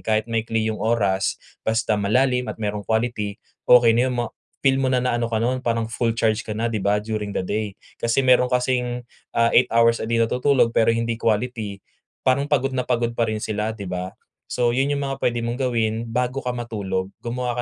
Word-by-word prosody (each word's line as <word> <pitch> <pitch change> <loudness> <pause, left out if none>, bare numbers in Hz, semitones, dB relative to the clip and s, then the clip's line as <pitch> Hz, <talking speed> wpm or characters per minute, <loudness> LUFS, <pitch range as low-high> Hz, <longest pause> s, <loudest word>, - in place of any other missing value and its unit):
kahit 110 0 +1
maikli 115 -1 0
yung 110 - -5
oras 100 -4 +1 0.2
basta 110 0 +1
malalim 125 +5 +2
at - - -8
merong 105 -1 -2
quality 110 -3 -1 0.3
okey 120 -2 +7
na 125 +2 +2
yon - - -2
ma-feel 135 +3 -1
mo 130 - +2
na 130 - +3
na 125 -1 +1
ano 120 -1 -1
ka 110 - +1
nun 125 +3 0
parang 115 -2 0
full 115 +1 0
charge 110 -1 +1
ka - - -6
na 115 +2 0
'di 110 -2 -2
ba, 100 +1 +2
during 105 -1 -3
the - - -1
day. 105 -1 -2 0.3
Kasi 115 +3 +2
meron 125 0 +5
kasing, 125 -1 0 0.3
ah, 115 0 +4
8 125 - +5
hours 115 0 +4
a - - -3
day 115 - +2
na 115 - +4
natutulog 125 -1 +2
pero 115 - +4
hindi 115 0 -1
quality 110 -2 -1 0.5
parang 130 +2 +3
pagod 135 -2 +1
na 125 - 0
pagod 120 0 0
pa 115 - +2
rin 110 - -2
sila, 105 0 -1
'di 100 -3 -7
ba? 90 +1 -4 0.4
So, 120 -1 +1
yun 135 +2 +2
yung 140 - -1
mga 135 0 -5
puwede 120 -1 +1
mong 120 - -2
gawin 115 -3 +1 0.2
bago 125 +3 -1
ka 125 - -2
matulog, 100 -6 -3
gumawa 120 0 -2
115 Hz, 210 wpm, -23 LUFS, 110-125 Hz, 0.5 s, okey